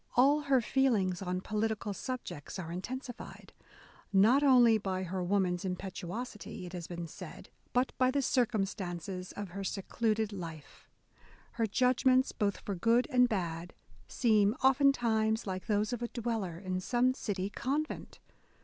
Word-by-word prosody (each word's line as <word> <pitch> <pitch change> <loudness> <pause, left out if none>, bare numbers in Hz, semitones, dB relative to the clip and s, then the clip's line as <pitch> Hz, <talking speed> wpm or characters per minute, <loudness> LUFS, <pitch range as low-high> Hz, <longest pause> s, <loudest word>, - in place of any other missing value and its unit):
A11 290 +4 +5
her 270 -3 +4
feelings 220 -8 +1
on 180 -1 -2
political 215 0 -2
subjects 240 - -6
are 170 -3 -5
intensified, 245 +7 -7 0.6
not 215 +8 +5
only 245 -5 +6
by 190 -2 -2
her 185 0 -3
woman's 180 -1 +1
impetuosity," 190 +3 -5
it 175 - -9
has 175 -2 -5
been 175 -1 -5
said, 165 - -10 0.2
but 250 +1 +1
by 255 0 +4
the 280 +1 +1
circumstances 195 -6 -1
of 205 -2 -6
her 195 +3 -6
secluded 215 +2 -1
life."... 165 -6 -9 0.6
Her 230 -1 0
judgments, 255 +3 +3
both 200 -2 -1
for 200 - -4
good 230 +7 +3
and 250 -1 +5
bad, 175 -4 -3 0.3
seem 215 -3 +3
oftentimes 240 -5 +3
like 185 -2 -4
those 210 +2 +1
of 240 - -3
a 240 - -1
dweller 225 -8 -3
in 185 0 -3
some 245 +6 +2
city 200 -5 -3
convent 290 +7 -3
210 Hz, 140 wpm, -32 LUFS, 185-245 Hz, 0.6 s, only